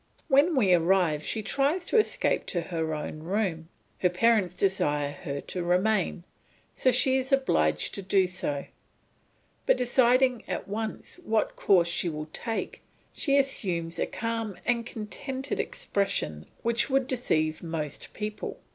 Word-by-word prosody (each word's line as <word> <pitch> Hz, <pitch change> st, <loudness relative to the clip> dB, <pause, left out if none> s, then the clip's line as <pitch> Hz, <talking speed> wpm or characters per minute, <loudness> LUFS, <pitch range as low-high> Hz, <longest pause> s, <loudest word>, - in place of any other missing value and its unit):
When 290 Hz, +5 st, +5 dB
we 200 Hz, -9 st, +4 dB
arrive 170 Hz, -3 st, +3 dB
she 220 Hz, +6 st, -2 dB
tries 280 Hz, -, +1 dB
to 460 Hz, -, +3 dB
escape 430 Hz, -, +1 dB
to 175 Hz, -, -1 dB
her 160 Hz, -2 st, -2 dB
own 150 Hz, 0 st, -5 dB
room; 165 Hz, -2 st, -2 dB, 0.3 s
her 180 Hz, -, +3 dB
parents 190 Hz, -1 st, +2 dB
desire 150 Hz, -7 st, +1 dB
her 140 Hz, -2 st, -5 dB
to 180 Hz, -, -5 dB
remain, 180 Hz, +1 st, +1 dB, 0.5 s
so 260 Hz, -, +2 dB
she 260 Hz, +2 st, +3 dB
is 265 Hz, +1 st, -2 dB
obliged 80 Hz, -, +2 dB
to 200 Hz, -, -4 dB
do 195 Hz, 0 st, +3 dB
so; 165 Hz, -6 st, -3 dB, 1.0 s
but -, -, +5 dB
deciding 250 Hz, 0 st, +3 dB
at 180 Hz, -, -3 dB
once 220 Hz, -, -4 dB
what 220 Hz, -5 st, 0 dB
course 180 Hz, -4 st, +4 dB
she 170 Hz, +1 st, -1 dB
will 155 Hz, -1 st, -6 dB
take 225 Hz, -2 st, -3 dB, 0.3 s
she 280 Hz, -2 st, +2 dB
assumes 180 Hz, -12 st, 0 dB
a -, -, 0 dB
calm 230 Hz, -3 st, -3 dB
and 235 Hz, -1 st, 0 dB
contented 260 Hz, +5 st, -5 dB
expression 80 Hz, -, -2 dB, 0.2 s
which 235 Hz, +3 st, +1 dB
would 270 Hz, -1 st, +2 dB
deceive 155 Hz, -12 st, 0 dB
most 160 Hz, -4 st, -5 dB
people. 210 Hz, 0 st, -5 dB
195 Hz, 145 wpm, -28 LUFS, 165-245 Hz, 1.0 s, When